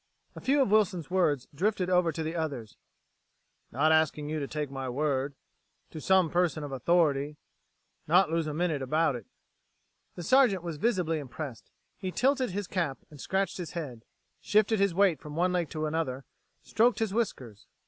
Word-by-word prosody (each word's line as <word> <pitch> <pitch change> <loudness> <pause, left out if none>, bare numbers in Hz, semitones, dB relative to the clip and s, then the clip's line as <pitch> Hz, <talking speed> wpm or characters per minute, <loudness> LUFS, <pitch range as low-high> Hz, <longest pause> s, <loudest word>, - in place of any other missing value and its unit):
A - - -9
few 275 +1 +3
of 205 - -2
Wilson's 185 -6 +2
words 155 -8 +1
drifted 190 +4 0
over 180 -2 +3
to 160 +1 -4
the 160 +2 -4
others; 140 -10 -4 1.0
"...not 150 +6 +2
asking 155 -2 +2
you 155 0 -2
to 140 - -3
take 150 -2 -4
my 135 -1 -4
word... 140 +1 -1 0.6
to 155 - -7
some 185 -2 +3
person 175 -3 +1
of 145 - -6
authority... 145 0 +1 0.7
not 175 +1 +4
lose 165 -1 0
a 150 - -3
minute 160 -4 0
about 155 +2 +1
it...." 120 -4 -8 0.9
The 175 - -6
Sergeant 210 -3 +4
was 170 -3 -5
visibly 175 -5 0
impressed. 135 -2 -7 0.3
He 185 - -3
tilted 265 +3 +1
his 200 +2 -3
cap 170 -8 -2
and 145 - -11
scratched 190 -1 -1
his 175 - -6
head; 135 -10 -6 0.4
shifted 215 0 +2
his 200 -3 +2
weight 190 -4 +3
from 150 0 -9
one 180 +2 +1
leg 175 -3 0
to 155 -1 -3
another; 150 -4 -2 0.4
stroked 230 0 +2
his 220 -3 -1
whiskers. 130 - -3
165 Hz, 175 wpm, -29 LUFS, 145-185 Hz, 1.0 s, not